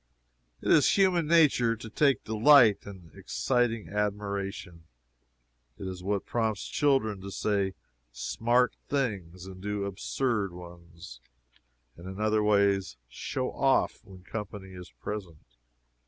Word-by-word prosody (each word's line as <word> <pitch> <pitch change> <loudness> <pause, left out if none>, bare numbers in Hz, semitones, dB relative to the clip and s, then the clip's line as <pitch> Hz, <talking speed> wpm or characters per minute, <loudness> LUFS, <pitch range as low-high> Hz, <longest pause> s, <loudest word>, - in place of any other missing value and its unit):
It - - +1
is 155 +4 +5
human 180 -5 +3
nature 145 -8 +4
to 115 - -10
take 135 +2 +2
delight 110 -1 +5
in 90 -5 -11
exciting 120 -4 -1
admiration. 100 -4 -3 0.9
It - - -7
is 95 -1 -6
what 100 +1 -2
prompts 110 -4 -1
children 135 -9 +1
to 100 - -7
say 100 -1 -1 0.4
"smart" 120 - +1
things, 95 -11 -2
and 95 -1 -10
do 105 0 -2
absurd 100 0 -2
ones, 85 -6 -12 0.8
and 85 +2 -11
in 95 +1 -7
other 110 0 +2
ways 100 -5 +2
"show 130 - -4
off" 135 -4 +1
when 95 -4 -14
company 100 -2 -7
is 90 -1 -10
present. 95 -7 -7
105 Hz, 125 wpm, -28 LUFS, 95-115 Hz, 0.9 s, is